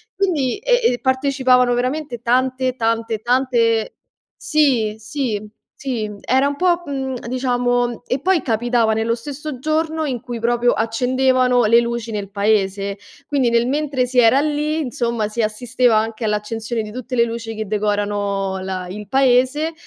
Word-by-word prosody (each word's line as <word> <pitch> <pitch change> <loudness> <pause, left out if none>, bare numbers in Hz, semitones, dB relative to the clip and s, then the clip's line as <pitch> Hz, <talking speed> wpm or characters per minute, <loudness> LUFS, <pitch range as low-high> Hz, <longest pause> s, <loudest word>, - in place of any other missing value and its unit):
quindi 340 -9 0
e - - +2
e 245 - -4
partecipavano 260 -2 +2
veramente 255 0 -2
tante, 255 +1 +1
tante, 225 -2 -1
tante 240 -3 +1 0.4
sì, 255 -9 +1
sì, 220 -3 -3 0.2
sì, 230 -6 -4
era 265 +2 +2
un 285 - -2
po' 355 -1 +2
mhmm, 265 -2 -3
diciamo 245 -2 0
e 255 - -1
poi 365 +1 +2
capitava 235 -1 +1
nello 225 +1 0
stesso 285 +2 -7
giorno 315 +2 -1
in 255 -4 -2
cui 245 -2 -6
proprio 240 +1 +2
accendevano 250 +2 +2
le 230 +2 +6
luci 235 -1 -3
nel 205 -2 -4
paese, 200 -1 0 0.3
quindi 270 -5 +1
nel 235 +1 +2
mentre 280 -2 0
si 250 0 +1
era 245 +4 +5
lì, 300 +1 -1
insomma, 235 -5 -2
si 230 +2 -2
assisteva 235 +2 +1
anche 220 +1 -1
all'accensione 220 +2 -2
di 210 0 -7
tutte 255 +2 -5
le 235 - +4
luci 230 -1 -5
che 220 - -4
decorano 205 -2 -1
la 185 -1 -4
il 210 +2 -7
paese 270 +4 +2
245 Hz, 150 wpm, -20 LUFS, 220-265 Hz, 0.4 s, le